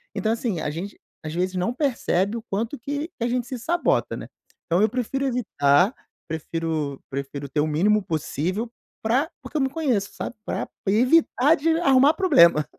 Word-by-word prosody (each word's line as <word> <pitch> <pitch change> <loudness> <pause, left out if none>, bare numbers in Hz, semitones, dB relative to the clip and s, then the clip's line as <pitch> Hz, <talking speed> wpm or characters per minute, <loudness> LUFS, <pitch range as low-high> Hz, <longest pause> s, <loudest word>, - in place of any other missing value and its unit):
Então, 220 - 0
assim, 225 -6 -1
a - - -2
gente, 175 +7 -6 0.2
às 155 0 -5
vezes, 185 +2 -1
não 185 +6 0
percebe 235 - 0
o 225 - -7
quanto 225 +5 -3
que 285 +5 -3
que 335 -9 -7
a - - +1
gente 245 0 -1
se 255 - -4
sabota, 340 +8 +1
né. - - -8 0.4
Então 170 +3 +2
eu 215 - +4
prefiro 255 +4 -2
evitar, 200 - +2 0.3
prefiro 160 -3 -3
prefiro 140 +1 -5
ter 150 +2 0
o 155 - +1
mínimo 200 +7 +2
possível 175 - -2 0.3
pra 255 +8 +1
porque - - -12
eu - - +1
me 265 - +1
conheço, 260 -9 -1
sabe, - - -5
pra - - -3 0.2
evitar 255 +6 +4
de 325 +2 +1
arrumar 275 -2 +5
problema. 170 - +5
220 Hz, 180 wpm, -24 LUFS, 170-265 Hz, 0.4 s, arrumar